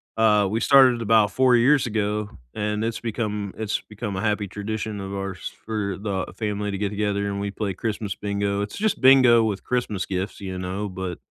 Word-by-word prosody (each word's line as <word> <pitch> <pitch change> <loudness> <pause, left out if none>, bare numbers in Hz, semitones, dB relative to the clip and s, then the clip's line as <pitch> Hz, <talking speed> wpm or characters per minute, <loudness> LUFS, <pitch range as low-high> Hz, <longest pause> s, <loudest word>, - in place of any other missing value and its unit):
Uh, 105 -3 +4
we 110 +2 0
started 130 -4 +5
about 110 -2 +4
4 130 +2 +4
years 130 +2 +4
ago, 105 -1 -1 0.3
and 105 0 -1
it's 115 0 -2
become 105 -3 -3
it's 110 -1 -2
become 105 -2 -6
a 95 - -2
happy 105 -2 0
tradition 105 +2 -4
of 95 0 -6
ours 95 -3 -5
for 105 -4 -2
the 100 -3 -3
family 105 -2 -2
to 100 - -3
get 100 0 -1
together, 100 -1 -1
and 100 0 -3
we 100 0 -2
play 100 -2 -3
Christmas 105 -1 -3
bingo. 100 0 -1
It's 105 - -5
just 215 -5 0
bingo 130 -3 +7
with 105 -3 -2
Christmas 115 -7 -1
gifts, 95 +2 -4
you 95 -2 -5
know, 95 +3 -3
but, 95 -2 -5
105 Hz, 195 wpm, -24 LUFS, 100-110 Hz, 0.3 s, bingo